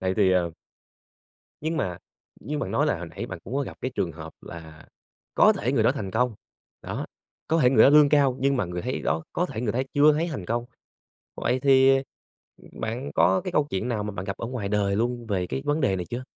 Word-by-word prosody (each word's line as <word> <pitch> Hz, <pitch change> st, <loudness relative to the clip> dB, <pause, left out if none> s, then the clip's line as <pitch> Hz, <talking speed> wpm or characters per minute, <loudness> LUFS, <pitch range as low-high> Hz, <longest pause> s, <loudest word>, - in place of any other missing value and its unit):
Này 95 Hz, 0 st, -1 dB
thì, 100 Hz, -3 st, +3 dB
ờ 90 Hz, -2 st, +1 dB, 1.1 s
Nhưng 160 Hz, +2 st, -2 dB
mà 90 Hz, -, -2 dB, 0.4 s
như 150 Hz, +7 st, -4 dB
bạn -, -, -3 dB
nói 145 Hz, -, +1 dB
là 145 Hz, -, +1 dB
hồi 90 Hz, -, -6 dB
nãy -, -, -6 dB
bạn -, -, -7 dB
cũng 125 Hz, -, -6 dB
có 140 Hz, -, +1 dB
gặp -, -, -7 dB
cái 130 Hz, -, -2 dB
trường 85 Hz, -3 st, -1 dB
hợp 80 Hz, 0 st, -9 dB
là 80 Hz, -2 st, -11 dB, 0.5 s
có -, -, +6 dB
thể 125 Hz, +5 st, -2 dB
người 125 Hz, -5 st, +2 dB
đó 115 Hz, -, +4 dB
thành 105 Hz, -9 st, -5 dB
công, 120 Hz, +2 st, 0 dB, 0.5 s
đó, -, -, -4 dB, 0.4 s
có 165 Hz, -, +2 dB
thể 125 Hz, -, +5 dB
người 120 Hz, -5 st, +6 dB
đó -, -, +8 dB
lương 150 Hz, -1 st, +7 dB
cao, 140 Hz, -3 st, +3 dB
nhưng 140 Hz, 0 st, +2 dB
mà 125 Hz, -, 0 dB
người 90 Hz, 0 st, -5 dB
thấy -, -, -3 dB
đó, 80 Hz, +3 st, 0 dB
có 180 Hz, -, 0 dB
thể 110 Hz, -, -6 dB
người 115 Hz, -4 st, -1 dB
thấy 130 Hz, +3 st, 0 dB
chưa 150 Hz, +1 st, +6 dB
thấy 165 Hz, +3 st, 0 dB
thành 140 Hz, -, -5 dB
công. 120 Hz, +4 st, -2 dB, 0.7 s
Vậy 125 Hz, +2 st, 0 dB
thì, 135 Hz, 0 st, +5 dB, 0.7 s
bạn 125 Hz, +6 st, -4 dB
có 185 Hz, -, +4 dB
cái 185 Hz, -, -4 dB
câu 150 Hz, -3 st, +2 dB
chuyện 95 Hz, +5 st, -2 dB
nào 115 Hz, -4 st, -1 dB
mà 105 Hz, -, -3 dB
bạn 90 Hz, -1 st, -5 dB
gặp 100 Hz, 0 st, -4 dB
ở 115 Hz, -, -5 dB
ngoài 120 Hz, -5 st, -4 dB
đời 100 Hz, -1 st, +1 dB
luôn 120 Hz, +1 st, -1 dB
về 95 Hz, -4 st, -1 dB
cái 65 Hz, -5 st, -4 dB
vấn 150 Hz, +2 st, +1 dB
đề 120 Hz, -9 st, +2 dB
này 90 Hz, -1 st, -4 dB
chưa? 120 Hz, +2 st, -4 dB
120 Hz, 240 wpm, -25 LUFS, 95-140 Hz, 1.1 s, đó